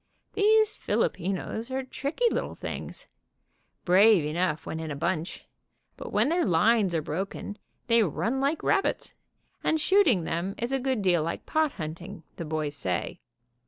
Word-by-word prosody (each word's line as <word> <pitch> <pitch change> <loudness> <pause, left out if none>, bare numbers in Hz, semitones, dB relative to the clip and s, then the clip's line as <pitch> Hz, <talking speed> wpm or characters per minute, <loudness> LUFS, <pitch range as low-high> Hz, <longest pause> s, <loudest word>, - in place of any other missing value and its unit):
Those 435 +1 +4
Filipinos 195 +5 -2
are 265 0 -2
tricky 280 - -3
little - - -2
things, - - -6 0.8
brave 190 -1 +5
enough 155 0 -1
when 160 - -4
in 160 -1 -5
a 145 - -3
bunch, 170 +3 -3 0.5
but - - -8
when - - +2
their 345 +2 +2
lines 190 +1 +3
are 160 - 0
broken 195 +6 -5 0.3
they 230 -1 +4
run 225 - 0
like 285 +4 0
rabbits, 395 -1 0 0.5
and 315 - +1
shooting 305 - +4
them 170 +4 -2
is 235 +2 -2
a 270 - +1
good 260 -5 -1
deal 175 -3 +3
like 165 +2 -4
pot 310 -2 +1
hunting, 170 +3 -7
the 170 - -5
boys 155 -1 -2
say. 90 -9 -3
195 Hz, 155 wpm, -27 LUFS, 165-265 Hz, 0.8 s, brave